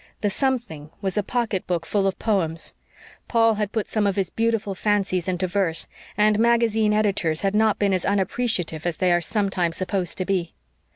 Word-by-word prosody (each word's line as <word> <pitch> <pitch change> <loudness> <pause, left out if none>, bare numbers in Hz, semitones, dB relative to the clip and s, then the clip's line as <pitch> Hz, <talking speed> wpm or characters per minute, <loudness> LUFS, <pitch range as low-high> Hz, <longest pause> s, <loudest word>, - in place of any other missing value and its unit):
The 205 - +1
"something" 235 - -2
was 195 -2 -2
a 210 - +2
pocketbook 195 -7 -2
full 200 -2 +1
of 190 - -1
poems. 170 -7 -1 0.5
Paul 225 -1 +4
had 210 -1 -1
put 220 -3 -1
some 215 -2 0
of 195 - 0
his 195 -3 -1
beautiful 225 -3 0
fancies 195 -3 0
into 185 0 0
verse, 180 -3 0 0.3
and 210 0 +4
magazine 225 -2 +3
editors 200 -7 +1
had 195 0 0
not 215 0 +3
been 200 -2 +1
as 185 - 0
unappreciative 190 -5 -1
as 170 - -2
they 185 -1 +2
are 175 0 +3
sometimes 185 -3 -1
supposed 185 -1 -2
to 185 - -2
be. 180 -3 -1
200 Hz, 180 wpm, -23 LUFS, 180-215 Hz, 0.5 s, Paul